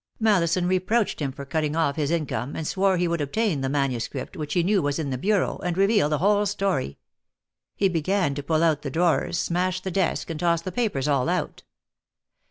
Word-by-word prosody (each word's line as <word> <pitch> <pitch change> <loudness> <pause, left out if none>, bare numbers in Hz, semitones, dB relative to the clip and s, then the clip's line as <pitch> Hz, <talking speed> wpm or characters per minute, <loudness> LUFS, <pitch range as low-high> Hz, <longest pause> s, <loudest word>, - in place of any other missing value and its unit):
Mallison 180 -5 +2
reproached 185 +5 +1
him 140 -2 -1
for 140 +1 -9
cutting 150 +1 -1
off 160 -4 +1
his 150 -3 -1
income, 145 -6 -2
and 160 - -4
swore 190 +2 +1
he 175 0 +1
would 170 -2 -1
obtain 160 +1 0
the 135 - -1
manuscript, 135 +1 -2
which 150 -2 -4
he 175 - +3
knew 195 +1 +2
was 145 -2 -1
in 150 -4 -3
the - - -1
bureau, 200 +4 +1
and 175 0 -3
reveal 195 -5 +3
the 150 - +1
whole 205 +5 +2
story. 195 - -1 0.8
He 200 - +2
began 180 -2 0
to 145 - -4
pull 155 +3 +1
out 160 -3 +2
the 140 - -4
drawers, 170 +3 +1
smash 180 +1 0
the 190 - -4
desk, 180 -2 -1
and 155 - -5
toss 170 -1 +1
the 185 - -4
papers 180 - -1
all 140 0 +1
out. 180 -4 -2
170 Hz, 205 wpm, -25 LUFS, 145-190 Hz, 0.8 s, he